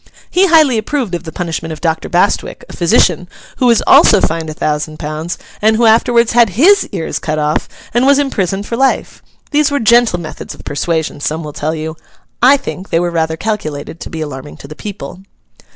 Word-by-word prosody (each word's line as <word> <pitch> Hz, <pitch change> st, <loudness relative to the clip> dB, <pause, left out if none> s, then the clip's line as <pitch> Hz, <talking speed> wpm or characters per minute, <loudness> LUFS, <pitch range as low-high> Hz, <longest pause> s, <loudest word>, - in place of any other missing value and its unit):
He 380 Hz, +2 st, +3 dB
highly 310 Hz, -9 st, +4 dB
approved 240 Hz, -3 st, -3 dB
of 175 Hz, 0 st, -4 dB
the 160 Hz, -, -6 dB
punishment 165 Hz, -1 st, -4 dB
of 155 Hz, -, -7 dB
Doctor 160 Hz, -1 st, -2 dB
Bastwick, 180 Hz, +3 st, 0 dB
a -, -, -11 dB
physician; 175 Hz, +1 st, +2 dB, 0.3 s
who 250 Hz, -, +2 dB
was 235 Hz, -2 st, +3 dB
also 210 Hz, -, +6 dB
fined 165 Hz, -2 st, -1 dB
a -, -, -5 dB
thousand 155 Hz, 0 st, -2 dB
pounds; 155 Hz, +3 st, -5 dB, 0.2 s
and 220 Hz, +1 st, +3 dB
who 230 Hz, +1 st, +2 dB
afterwards 235 Hz, +1 st, +3 dB
had 235 Hz, -2 st, +4 dB
his 350 Hz, -, +4 dB
ears 170 Hz, -5 st, -3 dB
cut 155 Hz, -1 st, -3 dB
off, 150 Hz, 0 st, -1 dB, 0.2 s
and 240 Hz, +3 st, +2 dB
was 280 Hz, 0 st, +5 dB
imprisoned 200 Hz, -8 st, -1 dB
for 230 Hz, -, -4 dB
life. 265 Hz, +2 st, 0 dB, 0.3 s
These 300 Hz, -1 st, +2 dB
were 285 Hz, 0 st, -1 dB
gentle 235 Hz, -4 st, +3 dB
methods 160 Hz, -2 st, -8 dB
of -, -, -15 dB
persuasion, 160 Hz, +1 st, -2 dB
some 155 Hz, +3 st, -3 dB
will 150 Hz, -1 st, -7 dB
tell 155 Hz, +3 st, -3 dB
you: 160 Hz, +1 st, -5 dB, 0.4 s
I 265 Hz, +4 st, +6 dB
think, 195 Hz, -8 st, -7 dB
they 165 Hz, -, +1 dB
were 175 Hz, 0 st, -1 dB
rather 160 Hz, -1 st, -1 dB
calculated 160 Hz, -7 st, -4 dB
to -, -, -8 dB
be 160 Hz, -, -6 dB
alarming 145 Hz, -1 st, -7 dB
to -, -, -12 dB
the 150 Hz, -, -10 dB
people. 180 Hz, -4 st, -8 dB
175 Hz, 200 wpm, -14 LUFS, 160-235 Hz, 0.4 s, also